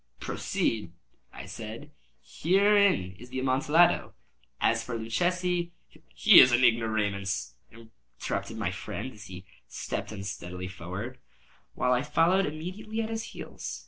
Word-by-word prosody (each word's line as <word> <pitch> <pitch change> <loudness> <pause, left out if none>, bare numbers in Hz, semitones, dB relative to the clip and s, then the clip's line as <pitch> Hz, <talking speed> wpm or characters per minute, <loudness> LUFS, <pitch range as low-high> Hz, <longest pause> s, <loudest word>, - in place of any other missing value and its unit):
"Proceed," 105 -7 -2 0.4
I - - -9
said; 115 +7 -8 0.3
"herein 195 - +3
is 125 +2 -12
the 130 - -6
Amontillado. 145 +6 +3 0.4
As 115 0 +2
for 120 0 -4
Luchesi—" 175 +9 -1 0.4
"He - - +8
is 125 - +8
an 120 +1 +3
ignoramus," 105 -4 +1 0.2
interrupted 115 -1 -7
my - - -1
friend, 130 +6 -6
as 105 -1 -12
he 95 -1 -10 0.2
stepped - - -5
unsteadily 90 -3 -6
forward, 95 +8 -7 0.6
while 125 - +1
I 125 - +2
followed 180 +7 +2
immediately 185 +9 -5
at 220 - -4
his 225 0 -3
heels. - - -7
120 Hz, 125 wpm, -28 LUFS, 105-175 Hz, 0.6 s, He